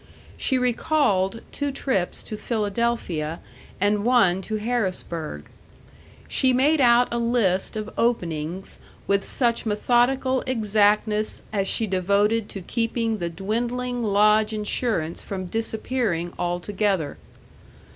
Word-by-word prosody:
She 260 - +1
recalled 235 -5 +1
two 285 -1 -2
trips 260 -9 -1
to 215 - -6
Philadelphia 210 -8 -2 0.4
and 205 +1 +2
one 210 -7 +4
to 215 +3 -4
Harrisburg. 185 - -3 0.8
She 260 -1 +2
made 285 +4 +3
out 245 0 +5
a 235 - 0
list 230 -6 +1
of 215 0 -5
openings 175 -6 -1 0.3
with 200 0 +2
such 235 -3 0
methodical 245 +4 +2
exactness 215 -2 +1
as 195 -2 0
she 225 - +2
devoted 200 +3 +1
to 195 - -6
keeping 230 0 -1
the 170 - -2
dwindling 240 +7 -2
lodge 210 +1 +3
insurance 210 -5 -1
from 190 -2 -5
disappearing 220 -4 -2
altogether. 180 -2 -1
215 Hz, 110 wpm, -24 LUFS, 190-240 Hz, 0.8 s, out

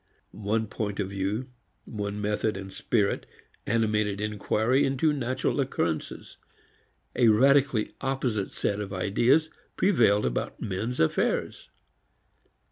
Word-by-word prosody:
One 110 +2 -1
point 105 -1 -4
of 95 -2 -1
view, 100 +6 -2 0.4
one 105 -1 -4
method 105 0 -1
and 95 0 -8
spirit 105 -1 0 0.4
animated 105 -3 +1
inquiry 105 +5 +1
into 135 +3 +2
natural 130 0 -1
occurrences; 85 - -2 0.8
a 120 - +4
radically 135 +1 +4
opposite 130 -7 -1
set 100 0 -2
of 100 -1 -5
ideas 120 - +2 0.3
prevailed 115 - +3
about - - -2
man's 110 +4 -3
affairs. 80 - 0
110 Hz, 110 wpm, -27 LUFS, 100-130 Hz, 0.8 s, a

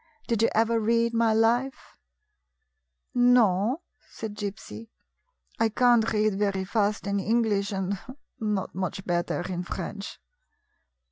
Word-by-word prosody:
Did 230 -3 0
you 230 - +4
ever 225 +1 +3
read 230 +1 +1
my 230 -1 +3
life? 235 +4 +1 0.6
" - - -53 0.2
"No," 220 - +2 0.3
said 220 -2 -6
Gypsy; 210 +2 -7 0.7
"I 225 0 +3
can't 240 0 +3
read 215 -2 +1
very 200 -2 0
fast 210 0 0
in 200 0 0
English, 210 -1 +1
and 195 0 -2 0.4
not 210 -4 -2
much 190 +1 -4
better 175 0 -1
in 180 -2 -3
French." 200 +3 -6
215 Hz, 125 wpm, -26 LUFS, 195-230 Hz, 0.7 s, you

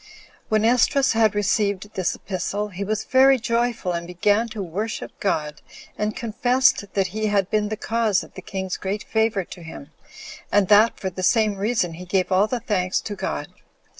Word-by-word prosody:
2. - - -23 0.4
When 215 0 +2
Esdras 250 +4 +3
had 220 -2 +3
received 205 0 0
this 185 -3 -1
epistle, 200 +2 -3
he 195 +1 -5
was 215 +1 -2
very 265 +1 +5
joyful, 235 -4 -1
and 170 0 -4
began 205 +6 +1
to 210 -2 -5
worship 205 +6 -4
God, 150 -6 -2 0.3
and 210 0 -2
confessed 245 +1 +2
that 195 -1 +2
he 215 0 -1
had 200 -3 +1
been 210 -1 +1
the 215 - -3
cause 220 -3 0
of - - -15
the 190 - -9
king's 190 0 -4
great 200 +1 -3
favor 220 -2 0
to 175 - -11
him, 160 -2 -10 0.6
and 205 -2 +3
that 215 +2 +5
for 190 - -3
the 185 - -6
same 215 +2 +3
reason 200 -4 0
he 180 +3 -9
gave 185 +1 0
all 190 +3 +4
the 250 +2 -2
thanks 185 -3 0
to 210 - -5
God. - - -4
205 Hz, 190 wpm, -23 LUFS, 190-220 Hz, 0.6 s, very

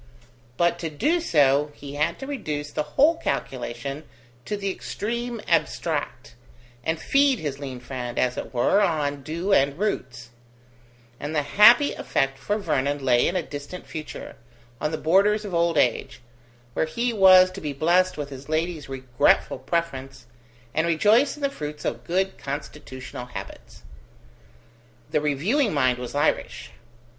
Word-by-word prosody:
But 170 0 +2
to 165 - -3
do 295 - +1
so, 145 - +3
he 140 -1 -9
had 150 +1 0
to 270 - -7
reduce 150 - -4
the - - -1 0.2
whole 320 +4 +5
calculation 135 - -4 0.4
to 210 - -3
the 200 -1 -2
extreme 235 +5 -4
abstract, - - -1 0.5
and 160 +3 -1
feed 275 - +3
his 145 -6 -4
lean 135 -3 -6
friend, 125 -1 -6
as 125 0 +1
it - - -6
were, 130 +11 +3
on 150 -6 0
dew 170 +8 -2
and 140 -3 +3
roots; 125 - -3 0.9
and 150 +2 -4
the 150 - +2
happy 235 - +6
effect 135 0 -1
for 205 +9 -1
Vernon 145 -7 -1
lay 120 -2 +4
in 175 - -1
a 180 - 0
distant 145 +5 -8
future, 155 -3 -8 0.4
on 150 - 0
the 155 - -3
borders 200 +7 +3
of 195 - -6
old 170 -1 +2
age, 125 -4 +1 0.5
where - - +1
he 235 +8 -1
was 185 -3 +7
to - - -9
be 150 - -3
blessed 175 +6 +2
with 145 -1 -5
his 135 +2 -10
lady's 160 -1 -2
regretful 130 -2 +1
preference, 135 -6 -3 0.5
and 160 +2 +1
rejoice 210 - +3
in 295 - -10
the - - +4
fruits 150 - -7
of 120 +1 -3
good 190 +2 -1
constitutional 130 -3 -7
habits. 125 - -10 1.3
The 150 - +1
reviewing 180 - +1
mind 130 -3 +2
was 125 +2 -6
Irish. 145 - -1
155 Hz, 150 wpm, -24 LUFS, 135-195 Hz, 1.3 s, was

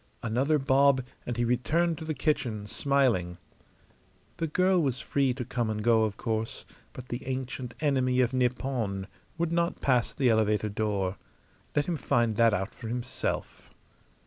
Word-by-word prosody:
Another 130 +7 +2
bob, 135 -1 +4 0.2
and 120 -1 -3
he 120 - +1
returned 160 +8 +1
to 160 - -6
the 155 -1 -2
kitchen, 120 -7 -1
smiling. 115 -8 +1 1.0
The 165 - -1
girl 185 +3 +3
was 135 -4 0
free 140 -1 +1
to 125 -2 -4
come 120 -2 -1
and 105 -1 -2
go, 115 -1 +4
of 105 -1 -4
course, 110 -1 -3 0.3
but 130 0 -10
the 120 +2 -4
ancient 130 -1 -4
enemy 130 -4 +2
of 125 +1 +1
Nippon 125 -6 -1 0.3
would 170 0 0
not 170 0 0
pass 125 -3 +2
the 135 -5 +1
elevator 105 -1 +2
door. 100 -3 -1 0.6
Let 145 -1 +2
him 170 -2 -1
find 120 -5 +1
that 115 -1 +5
out 95 0 -2
for 115 - -8
himself. 115 - -4
125 Hz, 160 wpm, -28 LUFS, 110-140 Hz, 1.0 s, that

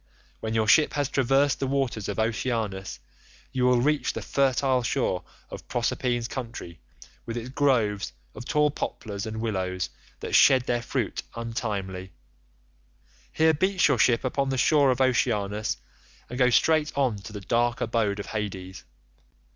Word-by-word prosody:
When 110 0 -3
your 110 -1 +2
ship 150 +6 +5
has 145 -2 0
traversed 135 +1 +2
the 135 - -1
waters 130 -7 -1
of 100 - -3
Oceanus, 110 -3 -2 0.5
you 125 -1 +1
will 125 -1 +4
reach 150 +4 +1
the - - -5
fertile 135 -1 +2
shore 115 -7 -1 0.3
of - - -9
Proserpine's 120 0 -1
country 115 -10 -7 0.5
with 115 0 -4
its 120 +1 -5
groves 115 - +1 0.2
of - - -8
tall 150 +3 +2
poplars 105 -6 -5
and 110 0 -5
willows 95 -5 -2 0.3
that - - -5
shed 130 -2 +6
their 120 -1 -1
fruit - - -2
untimely; 100 -6 -4 1.2
here 160 0 +3
beach 185 +2 +2
your 135 -5 +2
ship 120 0 +3
upon 135 +1 0
the 135 - -1
shore 145 +1 +4
of 130 0 +1
Oceanus, 105 -4 +1 0.5
and 125 - -5
go 125 -1 +5
straight 155 +4 +3
on 130 -6 +1
to 100 - -10
the 105 -1 -7
dark 120 +4 +1
abode 110 -3 0
of 100 - -4
Hades. 95 -4 -5
120 Hz, 155 wpm, -26 LUFS, 105-135 Hz, 1.2 s, shed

